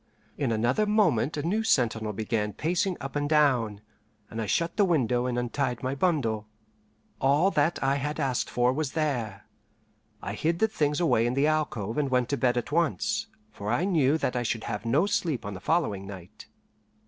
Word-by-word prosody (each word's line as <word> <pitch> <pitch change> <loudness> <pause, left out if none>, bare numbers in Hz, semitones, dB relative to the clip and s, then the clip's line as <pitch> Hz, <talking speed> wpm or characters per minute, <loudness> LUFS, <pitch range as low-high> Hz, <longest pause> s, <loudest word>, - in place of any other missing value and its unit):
In 135 -5 -1
another 120 - +1
moment 160 - +2
a 145 - -2
new 200 +7 0
sentinel 115 - +1
began 105 0 -2
pacing 175 +3 -1
up 135 +1 -7
and 145 0 -1
down, 125 -9 +2 0.5
and 115 - -4
I 110 - -3
shut 170 - 0
the 205 - +4
window 125 - +1
and 125 -1 -2
untied 125 0 -2
my 130 +1 -1
bundle. 135 -10 0 0.7
All 145 +8 +3
that 155 -1 +1
I 135 +1 +2
had 145 +3 -3
asked 135 -4 0
for 125 +1 +2
was 145 -1 -2
there. 120 - -2 0.7
I 100 - -5
hid 165 +9 0
the 220 - +3
things 150 -7 0
away 125 -9 +3
in 120 - -1
the 140 +2 +3
alcove 150 -8 -1
and 140 -2 0
went 125 -1 +1
to 140 - +1
bed 125 -2 +1
at 120 +4 -3
once, 170 +7 0 0.2
for 100 0 -6
I 150 +9 +1
knew 155 -6 +3
that 125 - -2
I 125 - 0
should 115 -1 -2
have - - -4
no 145 +10 +3
sleep 165 - -1
on 100 - -4
the 95 - -7
following 100 - 0
night. 95 -3 -11
135 Hz, 195 wpm, -27 LUFS, 115-155 Hz, 0.7 s, the